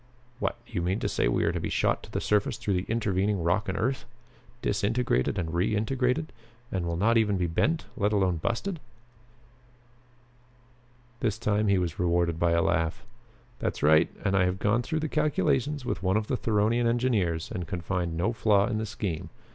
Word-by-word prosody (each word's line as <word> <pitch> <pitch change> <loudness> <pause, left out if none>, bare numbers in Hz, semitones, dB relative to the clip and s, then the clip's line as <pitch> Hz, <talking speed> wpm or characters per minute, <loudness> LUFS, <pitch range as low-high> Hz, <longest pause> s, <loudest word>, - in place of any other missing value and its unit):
"What? 120 - -1
You 110 -7 -3
mean 90 +5 0
to - - 0
say - - +1
we - - +1
are - - +2
to - - -2
be - - -3
shot - - +1
to - - -13
the - - -1
surface 105 +1 +1
through 110 -3 -1
the 90 +1 -1
intervening 100 -4 0
rock 95 +5 +1
and 95 - -2
earth? 130 +4 -1 0.6
Disintegrated 105 - +1
and 85 -3 -2
reintegrated? 125 - 0 0.4
And 90 -3 -2
we'll 85 - -1
not 115 +5 +4
even 105 -3 +2
be 90 - 0
bent, 150 - 0
let 105 0 +1
alone 95 -4 +2
busted?" 120 - -2 2.4
This 110 -3 0
time 105 -2 +1
he 100 -1 +4
was 90 -3 -2
rewarded 85 -2 +1
by 85 -1 +3
a 85 - +3
laugh. 80 -4 0 0.5
"That's - - -3
right. 75 +1 +5 0.2
And 100 - +2
I 95 -2 +4
have 90 +1 0
gone 105 +4 +2
through 155 +5 -2
the 155 - -1
calculations 150 -2 0
with - - -2
one 95 +2 +2
of 110 - -1
the 130 - -1
Theronian 115 +1 +1
engineers 110 -9 0
and 90 -3 -4
can 85 - -4
find 85 -2 -2
no 100 +8 +1
flaw 105 -3 +3
in 110 -1 -1
the 110 - -3
scheme. 90 -5 -4
100 Hz, 190 wpm, -28 LUFS, 90-115 Hz, 2.4 s, right